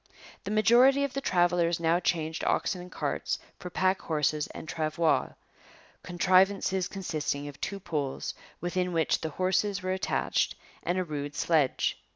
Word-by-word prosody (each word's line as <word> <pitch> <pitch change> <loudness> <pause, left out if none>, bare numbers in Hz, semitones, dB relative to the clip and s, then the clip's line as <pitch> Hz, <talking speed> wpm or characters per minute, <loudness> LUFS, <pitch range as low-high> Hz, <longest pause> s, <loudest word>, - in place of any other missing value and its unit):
The - - -3
majority 240 +6 +5
of 280 -1 -2
the 275 - -2
travellers 175 -5 +2
now 170 +1 +2
changed 160 -2 -1
oxen 180 - 0
and 180 +1 -11
carts - - -2 0.2
for 180 - -6
pack 185 +2 +1
horses 150 -1 0
and - - -9
travois, 155 0 0 0.7
contrivances 185 +1 +2
consisting 155 -6 -3
of 145 -1 -10
two 200 0 -3
poles, 145 -7 -3 0.3
within 180 +1 -1
which 165 -1 +1
the 160 - -2
horses 190 +4 0
were 185 0 0
attached, 190 - 0 0.3
and 175 - -1
a 185 - +1
rude 145 -3 -5
sledge. 155 -6 +1
175 Hz, 150 wpm, -29 LUFS, 160-190 Hz, 0.7 s, majority